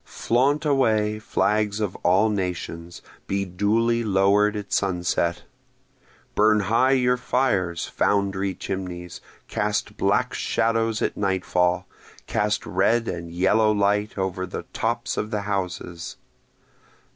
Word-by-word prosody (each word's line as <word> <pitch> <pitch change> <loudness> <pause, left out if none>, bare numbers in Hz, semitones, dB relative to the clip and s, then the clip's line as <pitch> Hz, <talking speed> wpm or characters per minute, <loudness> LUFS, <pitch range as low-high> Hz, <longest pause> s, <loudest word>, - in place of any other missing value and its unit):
Flaunt 140 +6 +1
away, 110 -7 +2
flags 105 0 0
of 105 -4 -2
all 95 +5 +3
nations! 85 -3 -4 0.2
be 100 0 -1
duly 110 +6 +1
lower'd 100 +1 +3
at 105 -1 -5
sunset! 90 -2 0 0.9
Burn 105 0 +4
high 115 +6 +3
your 125 -1 +2
fires, 100 -10 0
foundry 100 -1 0
chimneys! 90 -2 -6 0.3
cast 105 0 -2
black - - +1
shadows 115 -1 0
at - - -1
nightfall! 90 -2 0 0.4
cast 105 -1 -1
red 115 +5 +1
and 85 0 -4
yellow 95 +5 +3
light 105 +1 +1
over 95 -1 -2
the - - -6
tops - - -2
of 105 - -2
the 105 -2 -2
houses! 90 -4 -4
100 Hz, 115 wpm, -24 LUFS, 95-110 Hz, 0.9 s, Burn